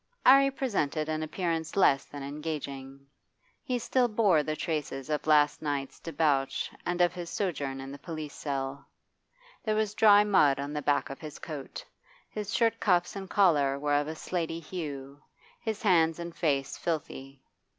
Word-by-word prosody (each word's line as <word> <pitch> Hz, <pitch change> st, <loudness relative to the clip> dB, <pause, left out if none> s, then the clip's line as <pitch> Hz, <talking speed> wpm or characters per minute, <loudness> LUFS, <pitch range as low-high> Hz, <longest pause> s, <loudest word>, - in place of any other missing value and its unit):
'Arry 275 Hz, +1 st, +7 dB
presented 190 Hz, -, -1 dB
an 155 Hz, 0 st, -2 dB
appearance 160 Hz, 0 st, -2 dB
less 140 Hz, -8 st, +4 dB
than 145 Hz, -1 st, -8 dB
engaging. 140 Hz, -2 st, -6 dB, 0.6 s
He 255 Hz, -4 st, -2 dB
still 245 Hz, +1 st, +1 dB
bore 210 Hz, -8 st, +3 dB
the 155 Hz, +1 st, -3 dB
traces 150 Hz, -3 st, -3 dB
of 150 Hz, +1 st, -2 dB
last 150 Hz, -1 st, +4 dB
night's 145 Hz, -3 st, -3 dB
debauch 140 Hz, -5 st, 0 dB, 0.2 s
and 175 Hz, 0 st, 0 dB
of 175 Hz, 0 st, +4 dB
his 175 Hz, -2 st, -6 dB
sojourn 140 Hz, -9 st, -2 dB
in 135 Hz, 0 st, -7 dB
the 140 Hz, -, -9 dB
police 155 Hz, -2 st, -6 dB
cell. 140 Hz, -1 st, -4 dB, 0.8 s
There 215 Hz, -1 st, 0 dB
was 215 Hz, -1 st, 0 dB
dry 210 Hz, -1 st, +6 dB
mud 150 Hz, -10 st, +4 dB
on 140 Hz, +1 st, -4 dB
the 150 Hz, -, -2 dB
back 145 Hz, -1 st, +1 dB
of 135 Hz, -, -8 dB
his 155 Hz, -2 st, -8 dB
coat, 145 Hz, -4 st, -7 dB, 0.5 s
his 210 Hz, -1 st, -5 dB
shirt 230 Hz, -1 st, +2 dB
cuffs 180 Hz, -2 st, +2 dB
and 195 Hz, -1 st, -6 dB
collar 145 Hz, -9 st, +3 dB
were 145 Hz, +1 st, -1 dB
of 145 Hz, 0 st, +2 dB
a 160 Hz, -, -4 dB
slaty 165 Hz, 0 st, -3 dB
hue, 145 Hz, -5 st, -7 dB, 0.4 s
his 220 Hz, -2 st, -4 dB
hands 165 Hz, -5 st, +4 dB
and 170 Hz, -1 st, -7 dB
face 140 Hz, -4 st, -1 dB
filthy. 135 Hz, -4 st, -4 dB
155 Hz, 165 wpm, -29 LUFS, 140-180 Hz, 0.8 s, Arry